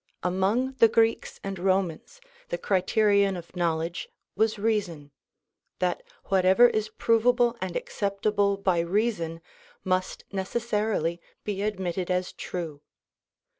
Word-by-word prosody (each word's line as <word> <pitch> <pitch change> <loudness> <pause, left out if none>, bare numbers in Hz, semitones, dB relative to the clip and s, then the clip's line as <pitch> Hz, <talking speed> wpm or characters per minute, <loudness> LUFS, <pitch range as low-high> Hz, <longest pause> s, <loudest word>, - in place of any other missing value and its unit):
Among 195 +9 +1
the 230 - +8
Greeks 225 0 +1
and 195 -2 -4
Romans 190 - -1 0.3
the - - -2
criterion 200 - +2
of 170 +1 -11
knowledge 165 -1 -1 0.3
was 220 0 +1
reason; 200 -9 -1 0.7
that 180 -1 0 0.2
whatever 190 +5 +5
is 215 -2 -1
provable 235 +2 +2
and 185 -2 -3
acceptable 200 0 0
by 185 -3 +1
reason 170 -2 -1 0.4
must 185 0 -1
necessarily 200 -4 -1 0.2
be 200 -2 -3
admitted 190 -3 -2
as 180 0 -1
true. 160 -5 -6
195 Hz, 110 wpm, -27 LUFS, 180-215 Hz, 0.7 s, the